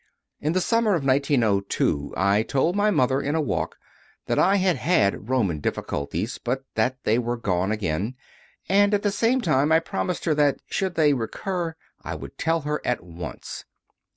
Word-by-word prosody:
4. 150 Hz, -, -5 dB
In 155 Hz, -, +2 dB
the 185 Hz, -, +1 dB
summer 230 Hz, -1 st, +2 dB
of 150 Hz, -5 st, -2 dB
1902 115 Hz, -, +1 dB
I 100 Hz, +3 st, +3 dB
told 140 Hz, -, 0 dB
my 205 Hz, +1 st, +3 dB
mother, 135 Hz, -7 st, +2 dB
in 145 Hz, +3 st, -1 dB
a -, -, +2 dB
walk, 150 Hz, -, -2 dB, 0.5 s
that -, -, 0 dB
I 195 Hz, +2 st, +4 dB
had 185 Hz, -3 st, +2 dB
had 105 Hz, -, +1 dB
Roman 105 Hz, -12 st, +1 dB
difficulties, 80 Hz, -, -3 dB
but 130 Hz, +2 st, -2 dB
that 125 Hz, +4 st, +1 dB
they 110 Hz, +3 st, +2 dB
were 120 Hz, 0 st, -2 dB
gone 95 Hz, -3 st, 0 dB
again; 105 Hz, +2 st, -2 dB, 0.5 s
and 205 Hz, +2 st, +4 dB
at 205 Hz, -, -2 dB
the 205 Hz, -, +2 dB
same 230 Hz, +5 st, +2 dB
time 150 Hz, -, +2 dB
I 160 Hz, -, +6 dB
promised 175 Hz, +2 st, -3 dB
her 160 Hz, -, +3 dB
that, 145 Hz, -2 st, +2 dB
should 190 Hz, -3 st, -2 dB
they 150 Hz, -3 st, +4 dB
recur, 165 Hz, -, -3 dB, 0.3 s
I -, -, -5 dB
would -, -, -10 dB
tell 165 Hz, 0 st, +1 dB
her 150 Hz, +1 st, -2 dB
at -, -, -1 dB
once. 85 Hz, 0 st, -8 dB
140 Hz, 180 wpm, -24 LUFS, 110-175 Hz, 0.5 s, I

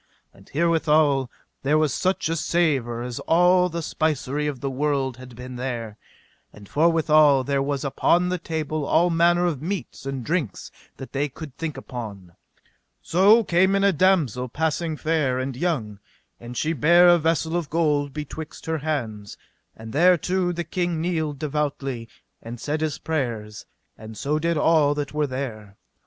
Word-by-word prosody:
And 95 Hz, -, -19 dB
herewithal 155 Hz, -4 st, +2 dB, 0.3 s
there 145 Hz, +3 st, +2 dB
was 155 Hz, -4 st, +1 dB
such 185 Hz, -2 st, 0 dB
a 165 Hz, -, -1 dB
savour 140 Hz, -9 st, 0 dB
as 125 Hz, -1 st, -5 dB
all 180 Hz, +2 st, +3 dB
the 170 Hz, -1 st, -4 dB
spicery 150 Hz, -2 st, -1 dB
of 140 Hz, -4 st, -4 dB
the 140 Hz, -, -3 dB
world 135 Hz, -2 st, -1 dB
had 125 Hz, -1 st, -12 dB
been 125 Hz, +1 st, -8 dB
there. 120 Hz, -4 st, -4 dB, 0.6 s
And 105 Hz, -1 st, -14 dB
forthwithal 155 Hz, -, +4 dB
there 140 Hz, 0 st, 0 dB
was 140 Hz, 0 st, -2 dB
upon 175 Hz, +6 st, +2 dB
the 180 Hz, 0 st, -1 dB
table 155 Hz, -1 st, -3 dB
all 170 Hz, +4 st, +2 dB
manner 175 Hz, +1 st, +3 dB
of 155 Hz, -6 st, -1 dB
meats 180 Hz, -5 st, -5 dB
and 135 Hz, -3 st, -4 dB
drinks 155 Hz, -, -2 dB, 0.3 s
that 135 Hz, -, -9 dB
they 145 Hz, +2 st, 0 dB
could 145 Hz, 0 st, -10 dB
think 155 Hz, -3 st, -5 dB
upon. 105 Hz, -9 st, -8 dB, 0.7 s
So 205 Hz, +7 st, +5 dB
came 190 Hz, +1 st, +3 dB
in 195 Hz, -, +1 dB
a 200 Hz, -1 st, +4 dB
damosel 150 Hz, -, +2 dB
passing 160 Hz, +3 st, -1 dB
fair 155 Hz, -5 st, 0 dB
and 130 Hz, 0 st, -3 dB
young, 125 Hz, -, -2 dB, 0.4 s
and 120 Hz, +1 st, -9 dB
she 160 Hz, +1 st, 0 dB
bare 170 Hz, +5 st, +5 dB
a 175 Hz, 0 st, +6 dB
vessel 165 Hz, +1 st, 0 dB
of 170 Hz, -4 st, -2 dB
gold 150 Hz, -3 st, +1 dB
betwixt 150 Hz, +1 st, -7 dB
her 160 Hz, -1 st, -1 dB
hands; 115 Hz, -9 st, -4 dB, 0.4 s
and 110 Hz, 0 st, -9 dB
thereto 180 Hz, +3 st, +3 dB
the 170 Hz, 0 st, -3 dB
king 175 Hz, 0 st, -2 dB
kneeled 160 Hz, -4 st, -2 dB
devoutly, 140 Hz, -5 st, -3 dB, 0.3 s
and 115 Hz, +1 st, -8 dB
said 150 Hz, +4 st, -2 dB
his 155 Hz, -2 st, -1 dB
prayers, 115 Hz, -9 st, -4 dB, 0.3 s
and 110 Hz, 0 st, -10 dB
so 150 Hz, +2 st, -1 dB
did 170 Hz, +1 st, 0 dB
all 150 Hz, -2 st, +3 dB
that 145 Hz, -1 st, -4 dB
were 150 Hz, -1 st, 0 dB
there. 110 Hz, -7 st, -6 dB
150 Hz, 165 wpm, -24 LUFS, 130-165 Hz, 0.7 s, a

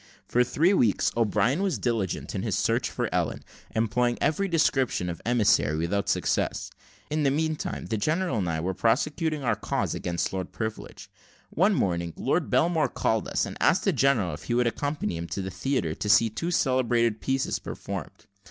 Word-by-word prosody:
For 125 Hz, -, +3 dB
three 155 Hz, +10 st, +2 dB
weeks, 115 Hz, -, +2 dB
O'Brien 120 Hz, -, +2 dB
was 195 Hz, -2 st, 0 dB
diligent 115 Hz, -7 st, -2 dB
in -, -, -2 dB
his -, -, -1 dB
search -, -, +1 dB
for -, -, -2 dB
Ellen, -, -, -1 dB, 0.3 s
employing 120 Hz, +2 st, +1 dB
every 195 Hz, +6 st, +1 dB
description 135 Hz, -, +1 dB
of 85 Hz, -, -8 dB
emissary 105 Hz, -10 st, +3 dB
without 100 Hz, +5 st, -1 dB
success. -, -, 0 dB, 0.4 s
In 155 Hz, 0 st, 0 dB
the 140 Hz, -, +3 dB
meanwhile, 155 Hz, +2 st, -2 dB
the 110 Hz, -, -1 dB
general 155 Hz, -, 0 dB
and 90 Hz, -3 st, -1 dB
I 80 Hz, -1 st, -1 dB
were 95 Hz, +3 st, -1 dB
prosecuting 150 Hz, -, 0 dB
our 115 Hz, -3 st, +2 dB
cause -, -, -2 dB
against 85 Hz, +1 st, -2 dB
Lord 95 Hz, -2 st, -4 dB
Privilege. 110 Hz, -1 st, -6 dB, 0.4 s
One 195 Hz, +5 st, +3 dB
morning, 85 Hz, -, -1 dB
Lord -, -, 0 dB
Belmore 160 Hz, -4 st, +2 dB
called 110 Hz, -2 st, 0 dB
upon -, -, -7 dB
us, -, -, +1 dB
and -, -, -7 dB
asked -, -, +3 dB
the -, -, +2 dB
general 120 Hz, -, +2 dB
if 75 Hz, +1 st, -10 dB
we 120 Hz, -, +1 dB
would 125 Hz, 0 st, +3 dB
accompany 140 Hz, -, -2 dB
him 85 Hz, 0 st, -5 dB
to 85 Hz, +4 st, -4 dB
the 95 Hz, -, -5 dB
theatre, 130 Hz, -, -1 dB
to 105 Hz, -, -4 dB
see 115 Hz, +1 st, +5 dB
two 165 Hz, +10 st, -3 dB
celebrated 120 Hz, -7 st, +1 dB
pieces 135 Hz, 0 st, -1 dB
performed. -, -, -7 dB
120 Hz, 185 wpm, -26 LUFS, 100-145 Hz, 0.4 s, see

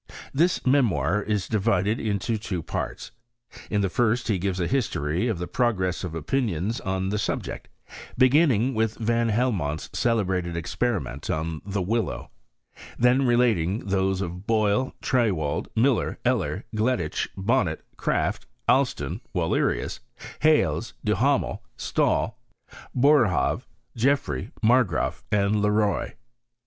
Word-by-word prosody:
This 170 Hz, +6 st, +2 dB
memoir 105 Hz, -, +2 dB
is 105 Hz, -2 st, -1 dB
divided 105 Hz, 0 st, +1 dB
into 110 Hz, +1 st, -1 dB
two 95 Hz, -6 st, -4 dB
parts. -, -, -4 dB, 0.6 s
In 105 Hz, -, +1 dB
the 100 Hz, -, +2 dB
first 120 Hz, +4 st, +1 dB
he 100 Hz, -4 st, +1 dB
gives 95 Hz, 0 st, -1 dB
a 90 Hz, -, +1 dB
history 90 Hz, -, 0 dB
of 110 Hz, -6 st, -1 dB
the 90 Hz, -, -3 dB
progress 95 Hz, -6 st, 0 dB
of 85 Hz, -3 st, -4 dB
opinions 105 Hz, -, -1 dB
on 95 Hz, 0 st, -2 dB
the 105 Hz, +1 st, -1 dB
subject, -, -, -3 dB, 0.5 s
beginning 130 Hz, -2 st, +4 dB
with 110 Hz, -1 st, 0 dB
Van 115 Hz, 0 st, +1 dB
Helmont's 105 Hz, -, -1 dB
celebrated 95 Hz, -7 st, 0 dB
experi 100 Hz, -, -1 dB
ment 65 Hz, +4 st, -8 dB
on 80 Hz, 0 st, -2 dB
the 100 Hz, -1 st, -2 dB
willow; 110 Hz, +1 st, -2 dB, 0.7 s
then 125 Hz, +2 st, +3 dB
relating 115 Hz, -6 st, +2 dB
those 95 Hz, -1 st, 0 dB
of 90 Hz, +1 st, -6 dB
Boyle, 110 Hz, +3 st, +1 dB
Triewald, 95 Hz, -, 0 dB
Miller, 120 Hz, +2 st, +2 dB
Eller, 115 Hz, -5 st, 0 dB
Gleditch, 110 Hz, -8 st, 0 dB
Bonnet, 95 Hz, -5 st, 0 dB
Kraft, -, -, -1 dB, 0.2 s
Alston, -, -, +1 dB
Wallerius, -, -, 0 dB, 0.4 s
Hales, 145 Hz, -, +2 dB
Duhamel, -, -, +1 dB, 0.2 s
Stahl, -, -, 0 dB, 0.6 s
Boer 140 Hz, -1 st, +5 dB
haave, 90 Hz, -, 0 dB, 0.3 s
Geoffrey, 115 Hz, -, 0 dB
Margraaf, 110 Hz, -8 st, +2 dB
and 105 Hz, 0 st, +2 dB
Le 105 Hz, -, +2 dB
Roy. 105 Hz, -1 st, 0 dB
105 Hz, 125 wpm, -25 LUFS, 90-120 Hz, 0.7 s, Boer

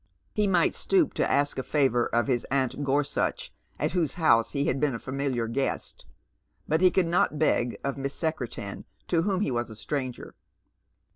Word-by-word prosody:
He 210 Hz, -2 st, +1 dB
might 180 Hz, -3 st, +3 dB
stoop 370 Hz, -6 st, +2 dB
to -, -, 0 dB
ask 145 Hz, -1 st, +1 dB
a -, -, +1 dB
favour 130 Hz, -4 st, +2 dB
of 120 Hz, +2 st, +1 dB, 0.2 s
aunt 135 Hz, +1 st, 0 dB
Gorsuch, 145 Hz, -, 0 dB, 0.3 s
at -, -, 0 dB
whosu 165 Hz, -7 st, 0 dB
house 135 Hz, -9 st, +3 dB
he 140 Hz, -1 st, 0 dB
had -, -, 0 dB
been 145 Hz, -3 st, +1 dB
a -, -, -5 dB
familiar 130 Hz, -3 st, -2 dB
guest, 135 Hz, +4 st, -3 dB, 0.6 s
but 160 Hz, +2 st, +1 dB
he 185 Hz, -, +7 dB
could 185 Hz, 0 st, +2 dB
not 165 Hz, -2 st, +1 dB
beg 125 Hz, -5 st, +1 dB
of 140 Hz, 0 st, -2 dB
Mie;. 135 Hz, 0 st, -1 dB
Secretan, 130 Hz, -, -4 dB, 0.2 s
to 170 Hz, -2 st, +2 dB
whom 190 Hz, +1 st, 0 dB
he 210 Hz, -, 0 dB
was 120 Hz, -1 st, -2 dB
a 110 Hz, -, -9 dB
stranger. 130 Hz, +2 st, -4 dB
140 Hz, 175 wpm, -27 LUFS, 125-165 Hz, 0.6 s, he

